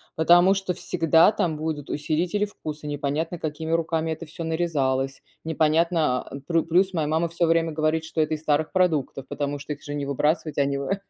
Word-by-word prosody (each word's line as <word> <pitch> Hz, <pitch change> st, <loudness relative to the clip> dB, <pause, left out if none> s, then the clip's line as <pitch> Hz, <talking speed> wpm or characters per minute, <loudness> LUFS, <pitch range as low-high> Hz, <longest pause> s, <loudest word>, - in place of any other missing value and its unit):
потому 175 Hz, +4 st, +5 dB
что 190 Hz, -2 st, -2 dB
всегда 165 Hz, 0 st, +3 dB
там 165 Hz, -7 st, -1 dB
будут 150 Hz, -2 st, -4 dB
усилители 170 Hz, +7 st, 0 dB
вкуса, 155 Hz, -7 st, -8 dB
непонятно 150 Hz, +3 st, -2 dB
какими 160 Hz, +1 st, -4 dB
руками 165 Hz, -1 st, 0 dB
это 160 Hz, +1 st, -6 dB
всё 165 Hz, +2 st, -7 dB
нарезалось, 135 Hz, -5 st, -1 dB, 0.2 s
непонятно, 160 Hz, -3 st, +2 dB
а 140 Hz, -, -9 dB
плю 165 Hz, +1 st, +1 dB
плюс 185 Hz, +3 st, +2 dB
моя 160 Hz, -4 st, 0 dB
мама 160 Hz, +2 st, 0 dB
всё 170 Hz, +1 st, 0 dB
время 165 Hz, 0 st, +2 dB
говорит, 155 Hz, +1 st, 0 dB
что 160 Hz, 0 st, -2 dB
это 155 Hz, 0 st, 0 dB
из 150 Hz, -, -9 dB
старых 155 Hz, 0 st, +1 dB
продуктов, 160 Hz, -8 st, 0 dB
потому 145 Hz, 0 st, -3 dB
что 145 Hz, +1 st, -5 dB
их 145 Hz, -, -13 dB
же 145 Hz, -, -5 dB
не 145 Hz, -1 st, -3 dB
выбрасывать, 150 Hz, +3 st, 0 dB
они 140 Hz, 0 st, +1 dB
в 140 Hz, -, -3 dB
э 195 Hz, -, -1 dB
160 Hz, 195 wpm, -24 LUFS, 150-165 Hz, 0.2 s, потому